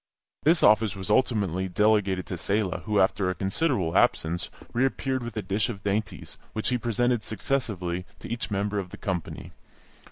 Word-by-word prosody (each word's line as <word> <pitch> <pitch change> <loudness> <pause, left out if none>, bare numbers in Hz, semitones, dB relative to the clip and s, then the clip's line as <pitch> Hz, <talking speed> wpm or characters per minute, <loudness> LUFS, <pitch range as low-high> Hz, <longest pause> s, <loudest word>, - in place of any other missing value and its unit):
This 160 +2 +3
office 105 -1 +5
was 95 +1 -4
ultimately 100 -7 +1
delegated 100 -1 +2
to 90 - -4
Selah, 100 0 0
who, 105 -1 +2
after 95 0 +2
a 95 - -1
considerable 95 - 0
absence, 85 +2 +2 0.2
reappeared 130 +1 0
with 120 -2 -6
a 105 - -1
dish 100 +5 0
of 100 -4 -6
dainties, 100 +1 -3
which 110 - 0
he 125 -1 +1
presented 120 0 +1
successively 95 -8 -2
to - - -9
each 120 0 -3
member 100 0 -1
of 95 -2 -5
the - - -10
company. 90 -5 -4
105 Hz, 165 wpm, -27 LUFS, 95-115 Hz, 0.2 s, office